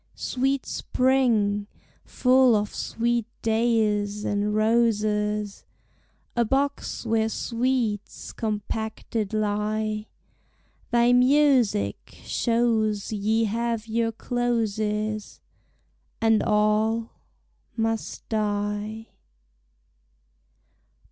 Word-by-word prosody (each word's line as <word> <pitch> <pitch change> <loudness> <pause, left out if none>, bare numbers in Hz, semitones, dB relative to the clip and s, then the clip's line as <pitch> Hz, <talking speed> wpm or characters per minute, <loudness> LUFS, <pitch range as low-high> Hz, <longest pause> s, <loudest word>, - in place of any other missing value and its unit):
Sweet 270 +1 -1
Spring, 230 -6 +1 0.4
full 255 -2 +4
of 210 0 -1
sweet 235 -1 -1 0.2
dayes 215 -2 +1
and 205 +1 0
roses, 210 -2 +1 0.7
A 240 - +3
box 275 +2 -1
where 225 -1 +1
sweets 230 -3 -2
compacted 220 0 -3
lie, 215 0 -1 0.8
Thy 240 0 +4
musick 250 - +2
shows 225 -3 0
ye 215 +2 +1
have 230 +1 -1
your 225 0 0
closes, 215 -3 -2 0.8
And 225 -1 +3
all 215 +2 +1 0.6
must 225 -1 -2
die. 210 +1 -2
220 Hz, 70 wpm, -25 LUFS, 210-235 Hz, 0.8 s, full